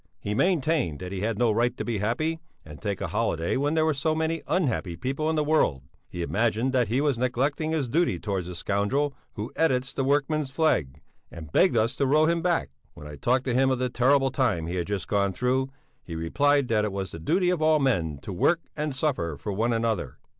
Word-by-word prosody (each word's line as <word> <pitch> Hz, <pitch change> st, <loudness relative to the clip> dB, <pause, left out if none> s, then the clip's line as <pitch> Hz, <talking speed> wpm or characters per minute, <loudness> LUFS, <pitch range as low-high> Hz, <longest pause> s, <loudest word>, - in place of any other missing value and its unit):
He 105 Hz, -, -3 dB
maintained 150 Hz, -, +1 dB
that 90 Hz, +2 st, -7 dB
he 95 Hz, -1 st, -4 dB
had 110 Hz, 0 st, -1 dB
no 120 Hz, -1 st, +3 dB
right 120 Hz, +3 st, +1 dB
to -, -, -4 dB
be 115 Hz, -4 st, -2 dB
happy 155 Hz, +11 st, -1 dB, 0.3 s
and 75 Hz, -1 st, -11 dB
take 100 Hz, -3 st, -3 dB
a -, -, -2 dB
holiday 80 Hz, +1 st, 0 dB
when 145 Hz, +4 st, 0 dB
there 160 Hz, -1 st, +3 dB
were 160 Hz, -, +2 dB
so 155 Hz, +3 st, 0 dB
many 160 Hz, +1 st, -1 dB
unhappy 120 Hz, -, 0 dB
people 135 Hz, -, -2 dB
in 160 Hz, -, 0 dB
the 150 Hz, -, +2 dB
world; 145 Hz, -, +1 dB, 0.3 s
he 85 Hz, -, -4 dB
imagined 115 Hz, +6 st, 0 dB
that 125 Hz, -3 st, +2 dB
he 125 Hz, +6 st, +1 dB
was 145 Hz, -5 st, +1 dB
neglecting 135 Hz, +5 st, 0 dB
his 155 Hz, -5 st, 0 dB
duty 155 Hz, -, +1 dB
towards 95 Hz, -1 st, -3 dB
the 90 Hz, -, -6 dB
scoundrel 105 Hz, +11 st, 0 dB, 0.2 s
who 110 Hz, +2 st, -6 dB
edits 130 Hz, -5 st, +1 dB
the 135 Hz, -, -1 dB
Workman's 145 Hz, +1 st, +1 dB
Flag, 85 Hz, -, 0 dB, 0.3 s
and 80 Hz, -3 st, -10 dB
begged 180 Hz, -, +4 dB
us 115 Hz, +3 st, +1 dB
to 140 Hz, -, +1 dB
row 155 Hz, +3 st, +4 dB
him 170 Hz, +1 st, +1 dB
back. 175 Hz, -1 st, 0 dB, 0.3 s
When -, -, -11 dB
I 75 Hz, 0 st, -8 dB
talked 125 Hz, -, +1 dB
to 125 Hz, -, 0 dB
him 130 Hz, +2 st, +3 dB
of 130 Hz, -, +1 dB
the 125 Hz, 0 st, -1 dB
terrible 135 Hz, +2 st, +3 dB
time 120 Hz, -, 0 dB
he 85 Hz, -, -4 dB
had 85 Hz, -, -2 dB
just 100 Hz, -5 st, -3 dB
gone 100 Hz, +1 st, +1 dB
through, 130 Hz, +4 st, 0 dB, 0.3 s
he 85 Hz, -, -7 dB
replied 140 Hz, -, +2 dB
that 110 Hz, -2 st, +2 dB
it 105 Hz, -, -1 dB
was 95 Hz, -2 st, -4 dB
the 80 Hz, -, -8 dB
duty 180 Hz, -, +1 dB
of 175 Hz, -3 st, -1 dB
all 155 Hz, 0 st, +4 dB
men 90 Hz, -, 0 dB
to 95 Hz, -, -5 dB
work 165 Hz, -, +2 dB
and 150 Hz, -2 st, -2 dB
suffer 125 Hz, -, -1 dB
for 105 Hz, +7 st, -4 dB
one 115 Hz, +5 st, 0 dB
another. 115 Hz, -5 st, -1 dB
125 Hz, 230 wpm, -26 LUFS, 100-145 Hz, 0.3 s, begged